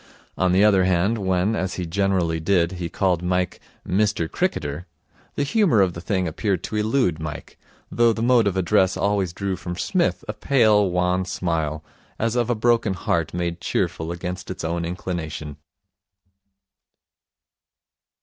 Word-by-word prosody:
On 95 -1 +1
the 95 +3 +4
other 95 -3 +4
hand, 95 +5 +1
when, 95 +2 +1
as 95 -2 -2
he 90 - -3
generally 90 -2 0
did, 85 0 +2
he 90 -2 -5
called 90 -1 0
Mike 90 0 -1 0.3
'Mister 100 -3 +1
Cricketer', 85 - -2 0.5
the 145 - 0
humour 165 - +3
of 95 -3 +3
the 85 - -7
thing 95 0 -1
appeared 95 +3 -1
to - - -5
elude 105 - +1
Mike, 75 -2 -7 0.3
though 120 -1 +4
the 115 0 -2
mode 120 -3 +4
of 95 -1 -1
address 95 0 +2
always 100 -3 0
drew 95 +1 -3
from 90 -1 -6
Psmith 175 - 0
a 105 - -3
pale, 105 -4 +3
wan 90 +1 +1
smile, 80 -4 -2 0.3
as 115 +1 -1
of 120 -1 +1
a 120 - +2
broken 115 -3 +2
heart 85 -2 -1
made 85 0 -3
cheerful 80 +1 -2
against 90 +1 -5
its 95 - -5
own 85 +1 -2
inclination. 80 -4 -5
95 Hz, 155 wpm, -23 LUFS, 85-105 Hz, 0.5 s, the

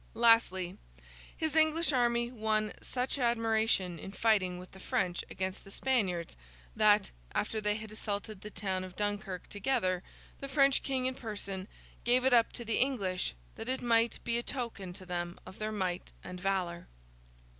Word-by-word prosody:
Lastly, 225 -6 +4 0.6
his 315 -2 -1
English 315 0 +4
army 240 -1 +2
won 215 -2 0
such 255 +2 -2
admiration 225 -7 +2
in 195 - -7
fighting 200 -5 +2
with 180 +1 -10
the 190 - -13
French 180 -2 0
against 190 0 -3
the - - -13
Spaniards, 195 -8 0 0.4
that, 210 -1 +5 0.2
after 215 +1 0
they 210 0 +1
had 215 0 -7
assaulted 210 -1 -4
the 210 - -7
town 190 -3 -2
of 185 -1 -9
Dunkirk 205 -3 -2
together, 195 -4 0 0.4
the 275 - -5
French 275 -1 +4
King 260 -2 -1
in 260 - +1
person 205 -5 -5 0.4
gave 250 +2 +3
it 265 - +5
up 230 -2 +5
to 235 - -6
the 225 - +1
English, 195 - 0 0.2
that 225 - -5
it 260 0 -1
might 230 -1 +3
be 235 0 +1
a - - -1
token 235 -8 -4
to 185 - -11
them 175 -1 -3
of 190 - -11
their 215 0 -1
might 185 -4 -2
and 180 0 -7
valour. 180 -3 -1
215 Hz, 165 wpm, -32 LUFS, 185-240 Hz, 0.6 s, that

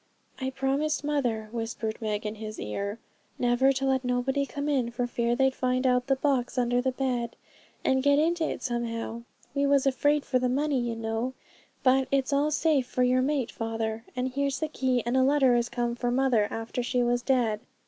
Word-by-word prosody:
'I 265 -1 -1
promised 280 +3 0
mother,' 250 -7 -1
whispered 225 -1 -4
Meg 215 -1 -2
in 210 - -2
his 215 0 -7
ear, 200 - -3 0.4
'never 245 +2 +3
to 270 +1 -2
let 265 -1 +1
nobody 260 +3 0
come 285 +1 -4
in, 265 -5 +1
for 240 +1 -2
fear 240 0 0
they'd 265 +1 +3
find 255 0 0
out 250 0 +2
the 270 - +3
box 265 -2 0
under 245 0 +2
the 260 +1 0
bed, 250 -3 -2 0.5
and 265 0 +3
get 285 +1 +4
into 330 +2 +2
it - - -5
somehow. 235 -2 -3 0.3
We 280 0 +1
was 280 -1 +3
afraid 290 +2 +2
for 255 - +1
the 250 0 +1
money, 280 +1 +1
you 240 -1 -2
know, 225 +3 -3 0.5
but 265 0 +4
it's 275 0 +1
all 285 +2 +2
safe 300 -4 +2
for 250 - 0
your 250 +1 +3
mate, 270 -3 0
father; 225 0 -3
and 250 +1 -1
here's 275 0 -1
the 315 - -2
key, 255 -4 0
and 240 +2 0
a 260 - +4
letter 270 -1 +4
as 240 0 +1
came 240 -1 -1
for 240 0 -2
mother 245 -4 +2
after 225 +2 -3
she 245 0 0
was 240 0 +1
dead.' 240 -5 +1
255 Hz, 200 wpm, -27 LUFS, 235-270 Hz, 0.5 s, get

